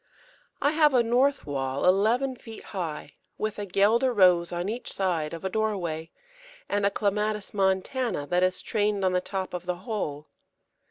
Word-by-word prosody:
I 285 - +4
have 305 -3 +4
a 240 - +5
north 260 +4 +2
wall 135 -1 -2
eleven 225 +8 +3
feet 225 -2 -11
high, 160 -6 -6 0.2
with 215 -1 -3
a 205 - -4
Guelder 220 +7 +3
Rose 180 -5 +4
on 175 +1 -2
each 230 +4 -4
side 170 -6 -1
of 165 +2 -7
a - - +2
doorway, 180 -7 -2 0.6
and 200 0 +1
a - - +3
Clematis 210 0 -1
montana 195 - 0
that 175 +4 +1
is 185 0 +1
trained 205 -2 0
on 185 - +3
the 180 0 +1
top 190 0 -4
of 180 0 -5
the 180 - 0
whole. 155 - -3
195 Hz, 170 wpm, -27 LUFS, 175-220 Hz, 0.6 s, a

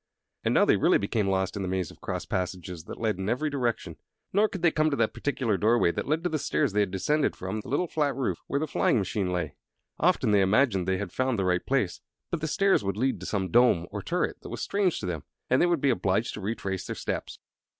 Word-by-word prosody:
And - - +1
now - - +6
they - - +4
really - - +4
became 100 0 -1
lost 95 0 0
in 100 - -3
the 95 - -2
maze 95 -2 -2
of - - -18
cross - - -4
passages 90 -2 -4
that - - -8
led 110 -4 0
in 95 +2 -2
every 145 +6 0
direction; 120 -5 -2 0.4
nor 210 +2 +4
could 190 -4 -7
they 170 - +5
come 155 0 +2
to 145 - 0
that - - +1
particular 125 -7 -1
doorway 110 -4 +3
that - - -4
led 155 +3 0
to 175 - +1
the 155 - 0
stairs 105 - 0
they 105 - +2
had 100 -2 +2
descended 150 +11 +1
from 95 +4 -4
the 105 - -9
little 145 +7 +1
flat 145 -4 0
roof 135 -2 -1
where 140 - 0
the 155 - 0
flying 140 - +2
machine 95 -2 -1
lay. 90 -5 -2 0.5
Often - - +3
they 100 -1 +5
imagined 95 -2 +3
they 95 0 +1
had 100 -2 -4
found 130 -2 0
the 95 - 0
right 90 -1 +1
place; 115 -10 0 0.3
but 170 - -2
the 155 - -1
stairs 195 - +3
would 100 0 -2
lead 130 +4 0
to - - -7
some 95 -4 -2
dome 120 -8 +4
or - - -4
turret - - -2
that - - -9
was - - -5
strange 195 -4 +1
to - - -4
them, 85 -4 -3 0.3
and 130 - +4
they 175 - +5
would 170 -2 +2
be 140 - +4
obliged 100 +1 0
to 105 - -6
retrace 95 -2 -3
their - - -4
steps. - - -4
110 Hz, 255 wpm, -27 LUFS, 95-140 Hz, 0.5 s, now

